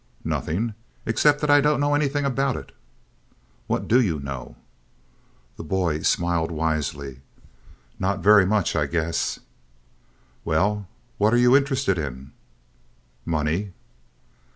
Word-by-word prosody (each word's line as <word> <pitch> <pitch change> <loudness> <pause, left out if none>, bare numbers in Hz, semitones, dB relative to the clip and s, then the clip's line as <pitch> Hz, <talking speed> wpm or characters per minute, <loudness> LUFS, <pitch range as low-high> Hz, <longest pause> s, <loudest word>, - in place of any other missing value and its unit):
"Nothing, 110 +8 -2 0.3
except 145 +6 +2
that 150 -1 +2
I 145 0 +6
don't 150 +1 +2
know 145 0 +1
anything 145 -1 0
about 135 -1 0
it." - - -10 1.0
"What - - -2
do 125 +3 +5
you 85 -10 0
know?" 70 -3 -7 1.0
The - - -7
boy 85 -2 -1
smiled 85 -1 +1
wisely. 75 -4 -3 0.8
"Not 95 0 -1
very 105 -1 +7
much, 100 -1 +1
I 75 -2 +1
guess." 85 +1 -1 1.1
"Well, 100 +5 0 0.3
what 105 +3 +3
are - - +4
you 125 +1 +5
interested 135 - +1
in?" 70 -2 -6 0.9
"Money!" 85 +5 -1
95 Hz, 120 wpm, -24 LUFS, 80-125 Hz, 1.1 s, very